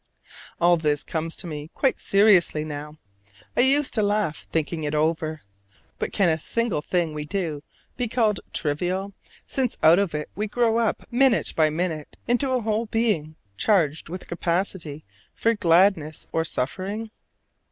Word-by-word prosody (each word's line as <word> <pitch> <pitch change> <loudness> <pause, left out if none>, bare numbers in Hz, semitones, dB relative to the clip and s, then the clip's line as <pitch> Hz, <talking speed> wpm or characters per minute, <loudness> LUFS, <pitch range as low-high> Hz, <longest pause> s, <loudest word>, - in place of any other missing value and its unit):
All 175 0 +5
this 150 -2 0
comes 165 0 -3
to - - -6
me 150 -2 -6
quite 270 - +1
seriously 195 -6 +4
now: 150 0 -7 0.6
I - - 0
used 275 +2 +3
to 220 - +2
laugh 205 -6 -1
thinking 160 0 -1
it 150 0 -2
over. 155 0 0 0.6
But - - -2
can 195 -4 +2
a 160 -1 +2
single 230 -2 -1
thing 170 -1 -1
we 150 0 -4
do 155 -3 -3 0.4
be 245 -1 -1
called 220 -3 +1
trivial, 180 +6 -1 0.3
since 255 -3 -1
out 165 +4 +7
of 195 -6 0
it 150 0 -4
we 210 +2 -2
grow 230 +1 +2
up 230 -2 0
minute 245 -6 +3
by 155 -1 +4
minute 160 -1 -3
into 245 +3 +1
a 255 -1 +1
whole 220 +1 -1
being 210 -9 0 0.2
charged 160 - +1
with 180 +2 -6
capacity 170 -3 -2 0.3
for 230 - +2
gladness 170 -5 +3
or 160 0 0
suffering? 195 - -3
175 Hz, 155 wpm, -24 LUFS, 155-215 Hz, 0.6 s, out